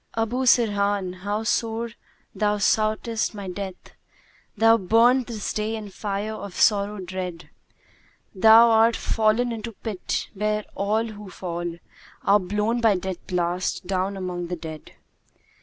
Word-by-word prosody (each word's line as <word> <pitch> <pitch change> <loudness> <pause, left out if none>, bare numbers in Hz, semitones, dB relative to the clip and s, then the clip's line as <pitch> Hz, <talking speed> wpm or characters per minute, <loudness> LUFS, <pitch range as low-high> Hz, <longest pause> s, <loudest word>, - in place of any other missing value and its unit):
Abu 240 +3 -1
Sirhan![FN#164] 205 -5 +2
how 205 +3 -2
sore 225 +1 -1 0.4
thou 210 -1 +1
sought'st 215 +2 0
my 200 -2 -6
death; 185 0 -7 0.3
* - - -34
Thou, 225 +2 +6
burnt 230 +5 +3
this 220 -4 -4
day 215 +1 -2
in 215 -2 -7
fire 205 +2 -3
of 200 -4 -8
sorrow 205 -1 +2
dread: 180 -2 -6 0.8
Thou'rt 225 +2 +6
fallen 225 +2 +1
into 230 0 -5
pit, 210 -2 -4
where 210 +1 -1
all 215 +3 0
who 210 -3 -9
fall 175 -2 -5 0.2
* - - -24
Are 205 +1 +5
blown 210 +5 -1
by 220 -3 +4
Death 185 -1 -5
blast 180 0 -1
down 190 +1 -1
among 180 -2 -4
the 180 - -3
dead." 160 -2 -9
210 Hz, 140 wpm, -24 LUFS, 185-225 Hz, 0.8 s, Thou